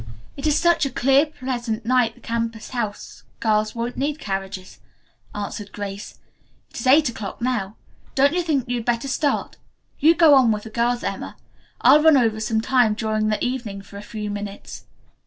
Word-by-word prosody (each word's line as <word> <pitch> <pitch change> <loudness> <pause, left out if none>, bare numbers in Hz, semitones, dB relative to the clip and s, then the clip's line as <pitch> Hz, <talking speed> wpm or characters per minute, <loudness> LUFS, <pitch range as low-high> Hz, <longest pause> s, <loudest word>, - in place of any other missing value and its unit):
It 275 - -3
is 300 - +3
such 345 -1 +3
a 275 - +1
clear, 270 +4 +3
pleasant 240 -6 -4
night 250 -1 +2
the - - -20
campus 230 -1 -3
house 225 -5 -5 0.2
girls 215 0 +1
won't 235 +1 -4
need 290 +2 -1
carriages," 195 -6 -5 0.6
answered 205 0 -5
Grace. 200 0 -7 0.5
"It - - -7
is 235 - -3
eight 290 +3 +6
o'clock 220 -4 -6
now. 230 -5 -2 0.4
Don't 280 +2 +4
you 355 - +1
think 295 -7 -1
you 245 0 -1
had 230 - -5
better 240 +2 0
start? 280 +2 -1 0.4
You 325 +3 +5
go 325 -3 +6
on 260 -4 +5
with 210 -1 -2
the 220 - -10
girls, 240 +2 0
Emma. - - -5 0.4
I'll 300 - +7
run 315 -2 +6
over 225 -4 +1
some 220 0 0
time 240 -3 +3
during 215 -1 -1
the 215 +2 0
evening 230 -6 -4
for 200 - -12
a - - -7
few 210 0 -6
minutes." 205 0 -7
235 Hz, 185 wpm, -22 LUFS, 215-265 Hz, 0.6 s, I'll